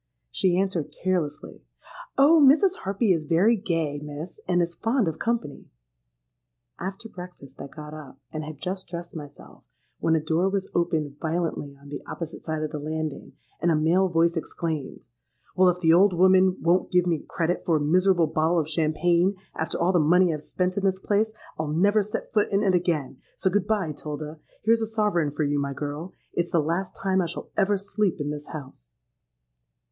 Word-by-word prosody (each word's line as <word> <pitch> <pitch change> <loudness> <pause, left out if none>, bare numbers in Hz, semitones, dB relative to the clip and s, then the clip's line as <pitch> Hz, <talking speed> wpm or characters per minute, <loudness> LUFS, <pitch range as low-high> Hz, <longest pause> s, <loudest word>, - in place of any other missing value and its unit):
She 180 -2 +2
answered 190 -5 -1
carelessly, 180 -5 -2 0.6
'Oh! 300 +4 +6
Mrs. 335 +8 +5
Harpy 200 +1 +1
is 160 -3 -2
very 180 +9 +4
gay, 165 -7 -2
Miss, 150 +4 -7
and 180 -1 +2
is 170 -1 0
fond 225 +2 0
of 160 -1 -3
company.'—After 120 - -7
breakfast 180 - -11
I 140 - -6
got 150 +1 -10
up, 150 -3 -10 0.2
and 155 0 -3
had 155 -1 -7
just 185 +4 -5
dressed 170 0 -7
myself, 145 -2 -11 0.4
when 165 - +2
a - - +3
door 160 +4 +1
was 195 -1 -2
opened 155 -4 -1
violently 160 -4 -2
on 140 0 -14
the 145 - -6
opposite 165 -1 -6
side 155 -1 -3
of 155 - -3
the 150 - -4
landing, 155 -1 -4 0.3
and 175 - +2
a 165 - +4
male 170 +5 +3
voice 170 0 +2
exclaimed, 160 -3 -4 0.5
'Well, 185 0 +5
if 180 0 0
the 165 -2 +5
old 190 +3 +5
woman 185 +1 +5
won't 175 +2 +2
give 180 -1 +3
me 170 -3 +1
credit 170 0 -1
for 165 - +2
a - - +2
miserable 175 +3 +3
bottle 160 +2 +1
of 155 -3 +1
champagne, 170 +4 +2 0.2
after 160 - -3
all 175 +3 +2
the 175 - +4
money 175 +3 +4
I've 150 - -5
spent 180 +4 -2
in - - -7
the 190 -1 +1
place, 215 +2 +2 0.3
I'll 155 - -1
never 200 +8 +3
set 210 +1 -5
foot 210 -1 +2
in 200 +1 +2
it 195 -2 +3
again. 165 -7 0 0.2
So 190 - +1
good 200 0 +1
bye, 200 -7 0
'Tilda. 150 +1 -7 0.2
Here's 230 +1 +3
a 220 - -1
sovereign 210 -8 +1
for 150 +2 -2
you, 145 0 +1
my 140 0 -2
girl. 145 +6 -5 0.2
It's 175 0 -1
the 170 - +2
last 170 +5 -1
time 190 -1 +1
I 175 - -1
shall 170 - -7
ever 205 0 +2
sleep 200 -1 -1
in 145 0 -2
this 150 0 -6
house.' 130 - -10
170 Hz, 190 wpm, -25 LUFS, 150-190 Hz, 0.6 s, Oh